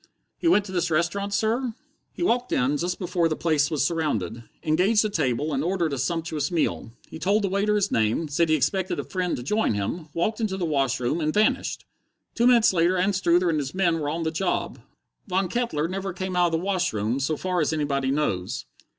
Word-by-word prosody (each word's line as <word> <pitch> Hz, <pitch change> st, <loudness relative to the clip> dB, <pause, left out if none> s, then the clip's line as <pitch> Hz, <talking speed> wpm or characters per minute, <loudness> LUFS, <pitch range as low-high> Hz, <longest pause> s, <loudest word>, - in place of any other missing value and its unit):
_" -, -, -42 dB, 0.3 s
"He -, -, -2 dB
went 210 Hz, -, +4 dB
to 190 Hz, -, -8 dB
this 175 Hz, -2 st, 0 dB
restaurant, 170 Hz, +5 st, 0 dB
sir?" 225 Hz, +3 st, 0 dB, 0.4 s
"He -, -, -5 dB
walked 250 Hz, -6 st, +1 dB
in, 130 Hz, +4 st, +2 dB
just 175 Hz, +4 st, -2 dB
before 175 Hz, -2 st, 0 dB
the 155 Hz, -, -1 dB
place 155 Hz, -3 st, +1 dB
was 150 Hz, -4 st, 0 dB
surrounded, 120 Hz, -, -2 dB, 0.2 s
engaged 195 Hz, +8 st, +3 dB
a 215 Hz, -, -1 dB
table, 145 Hz, -, 0 dB
and 135 Hz, +1 st, 0 dB
ordered 170 Hz, -3 st, 0 dB
a 135 Hz, -, -3 dB
sumptuous 155 Hz, +1 st, -1 dB
meal. 165 Hz, -8 st, -1 dB, 0.2 s
He -, -, -9 dB
told 200 Hz, +5 st, +2 dB
the 195 Hz, -, +1 dB
waiter 200 Hz, +2 st, +1 dB
his 205 Hz, -1 st, +1 dB
name, 115 Hz, +8 st, +1 dB
said 160 Hz, +3 st, +1 dB
he 155 Hz, -, +4 dB
expected 185 Hz, +7 st, 0 dB
a -, -, -2 dB
friend 185 Hz, -2 st, -2 dB
to 120 Hz, -, -6 dB
join 210 Hz, -, +1 dB
him, 130 Hz, -, -3 dB
walked 215 Hz, +7 st, -1 dB
into 200 Hz, -4 st, -1 dB
the 180 Hz, -, -1 dB
wash 135 Hz, -6 st, 0 dB
room 125 Hz, +7 st, -1 dB
and 155 Hz, 0 st, +1 dB
vanished! 210 Hz, +5 st, +1 dB, 0.5 s
Two 235 Hz, +1 st, +3 dB
minutes 235 Hz, -4 st, +5 dB
later 175 Hz, +1 st, +2 dB
Anstruther 180 Hz, -2 st, +2 dB
and 155 Hz, -, 0 dB
his 140 Hz, +3 st, -4 dB
men 170 Hz, -4 st, +2 dB
were 145 Hz, -2 st, -2 dB
on 165 Hz, +2 st, -2 dB
the 160 Hz, -, -1 dB
job. 180 Hz, +3 st, -2 dB, 0.5 s
Von 190 Hz, 0 st, 0 dB
Kettler 175 Hz, -9 st, -1 dB
never 190 Hz, +1 st, -4 dB
came 185 Hz, 0 st, -4 dB
out 175 Hz, -1 st, +4 dB
of 165 Hz, -, -4 dB
the -, -, +3 dB
wash 185 Hz, -, -1 dB
room, 110 Hz, +5 st, -1 dB
so 145 Hz, +3 st, -1 dB
far 180 Hz, -2 st, -1 dB
as 155 Hz, -, +1 dB
anybody 140 Hz, -3 st, 0 dB
knows. 135 Hz, -11 st, -1 dB
170 Hz, 220 wpm, -25 LUFS, 150-195 Hz, 0.5 s, minutes